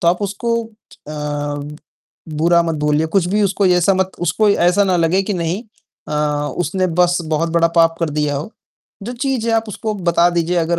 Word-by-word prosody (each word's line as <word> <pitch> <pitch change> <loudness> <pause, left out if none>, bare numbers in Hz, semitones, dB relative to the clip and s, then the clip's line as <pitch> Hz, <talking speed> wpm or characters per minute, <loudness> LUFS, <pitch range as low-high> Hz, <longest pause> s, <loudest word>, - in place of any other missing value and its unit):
तो 170 - +2
आप 175 +4 +1
उसको 210 +4 -2
अ, - - -12 1.6
बुरा 170 +3 +2
मत 165 -1 -2
बोलिए, 150 +1 +2
कुछ 175 +2 +1
भी 210 +2 +1
उसको 200 0 +1
ऐसा 180 +1 +3
मत 190 0 0
उसको 210 +4 +2
ऐसा 180 +1 +3
ना 185 -2 +2
लगे 170 +3 +2
कि 205 - -3
नहीं 175 +5 -2 0.5
अ, - - -5 0.5
उसने 185 +2 0
बस 175 0 +2 0.2
बहुत 165 +2 0
बड़ा 165 0 +3
पाप 165 0 +4
कर 165 -2 0
दिया 150 -1 -1
हो। 150 +9 -5 0.5
जो 235 +5 -5
चीज़ 255 -2 -2
है - - +2
आप 225 0 0
उसको 215 +1 -4
बता 175 -2 +2
दीजिए, 175 0 0
अगर 170 0 +1
175 Hz, 195 wpm, -18 LUFS, 165-200 Hz, 1.6 s, पाप